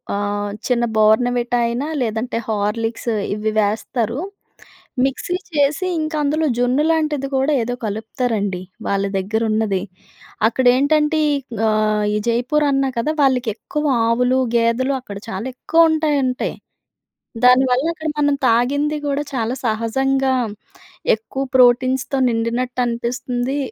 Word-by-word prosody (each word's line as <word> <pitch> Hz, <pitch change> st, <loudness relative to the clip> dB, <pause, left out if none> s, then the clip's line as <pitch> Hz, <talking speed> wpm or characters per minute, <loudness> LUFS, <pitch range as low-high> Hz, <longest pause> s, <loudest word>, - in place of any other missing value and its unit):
ఆహ్, 205 Hz, 0 st, -2 dB, 0.2 s
చిన్న 240 Hz, -2 st, +1 dB
బోర్న్‌వీటా 240 Hz, +3 st, +3 dB
అయినా 245 Hz, +6 st, -2 dB
లేదంటే 230 Hz, +1 st, -2 dB
హార్లిక్స్ 225 Hz, +2 st, -2 dB, 0.2 s
ఇవి 215 Hz, +1 st, -2 dB
వేస్తారు. 225 Hz, +3 st, -1 dB, 0.8 s
మిక్సీ 270 Hz, +6 st, -1 dB, 0.2 s
చేసి 290 Hz, +3 st, +1 dB
ఇంకా 310 Hz, 0 st, -2 dB
అందులో 310 Hz, +2 st, +1 dB
జున్ను 250 Hz, +4 st, +2 dB
లాంటిది 305 Hz, -4 st, 0 dB
కూడా 270 Hz, +3 st, +2 dB
ఏదో 245 Hz, +2 st, -2 dB
కలుపుతారండి. 215 Hz, -3 st, -2 dB, 0.3 s
వాళ్ళ 200 Hz, 0 st, 0 dB
దగ్గర 205 Hz, +4 st, -1 dB
ఉన్నది. 215 Hz, -4 st, 0 dB, 0.7 s
అక్కడ 250 Hz, +3 st, -1 dB
ఏంటంటే 300 Hz, +3 st, +2 dB, 0.5 s
ఆహ్, 215 Hz, -1 st, +1 dB
ఈ -, -, +2 dB
జైపూర్ 250 Hz, +6 st, +1 dB
అన్నా 270 Hz, -1 st, +1 dB
కద, 230 Hz, -, -1 dB
వాళ్ళకెక్కువ 255 Hz, +2 st, 0 dB, 0.2 s
ఆవులు, 250 Hz, +3 st, +2 dB, 0.2 s
గేదెలు 235 Hz, +4 st, +2 dB
అక్కడ 200 Hz, -5 st, -8 dB
చాలా 195 Hz, +3 st, -4 dB
ఎక్కువ 330 Hz, +5 st, +2 dB
ఉంటాయంటయి. 290 Hz, -5 st, 0 dB, 0.9 s
దానివల్ల 250 Hz, +1 st, +5 dB
అక్కడ 315 Hz, -1 st, -6 dB
మనం 290 Hz, -1 st, +3 dB
తాగింది 285 Hz, +6 st, +2 dB
కూడా 285 Hz, +1 st, 0 dB
చాలా 235 Hz, -1 st, -1 dB
సహజంగా, 265 Hz, +4 st, +1 dB, 0.8 s
ఎక్కువ 225 Hz, +5 st, -5 dB
ప్రోటీన్స్‌తో 255 Hz, +2 st, +3 dB
నిండినట్టు 240 Hz, +2 st, -1 dB
అనిపిస్తుంది. 245 Hz, +3 st, -2 dB
245 Hz, 115 wpm, -19 LUFS, 225-275 Hz, 0.9 s, దానివల్ల